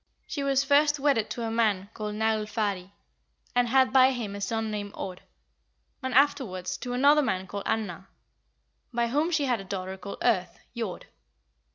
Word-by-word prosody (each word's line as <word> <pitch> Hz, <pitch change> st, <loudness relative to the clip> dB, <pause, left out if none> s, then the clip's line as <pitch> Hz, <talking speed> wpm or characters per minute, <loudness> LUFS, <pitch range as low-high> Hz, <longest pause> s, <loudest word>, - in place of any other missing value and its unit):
She 290 Hz, -, -4 dB
was 275 Hz, -1 st, +2 dB
first 290 Hz, +1 st, +4 dB
wedded 275 Hz, -6 st, +2 dB
to 235 Hz, -, -4 dB
a 225 Hz, -, -2 dB
man 210 Hz, -4 st, +1 dB
called 210 Hz, -1 st, -4 dB
Naglfari, 215 Hz, -3 st, -1 dB, 0.7 s
and 245 Hz, 0 st, +3 dB
had 260 Hz, +1 st, +4 dB
by 260 Hz, 0 st, +6 dB
him 225 Hz, -5 st, -4 dB
a 200 Hz, -, -6 dB
son 220 Hz, +2 st, -1 dB
named 205 Hz, -1 st, -4 dB
Aud, 180 Hz, -1 st, -6 dB, 0.8 s
and 260 Hz, -1 st, -3 dB
afterwards 195 Hz, -10 st, +2 dB
to 245 Hz, +5 st, -5 dB
another 285 Hz, +4 st, +5 dB
man 190 Hz, -9 st, -1 dB
called 200 Hz, +2 st, -6 dB
Annar, 195 Hz, -4 st, -2 dB, 0.8 s
by 235 Hz, -1 st, 0 dB
whom 295 Hz, +7 st, +1 dB
she 315 Hz, -4 st, +1 dB
had 245 Hz, -4 st, +1 dB
a -, -, -7 dB
daughter 190 Hz, -1 st, -5 dB
called 200 Hz, +1 st, -7 dB
Earth 195 Hz, -7 st, +1 dB, 0.2 s
(Jord). 225 Hz, -6 st, -4 dB
225 Hz, 170 wpm, -27 LUFS, 200-265 Hz, 0.8 s, by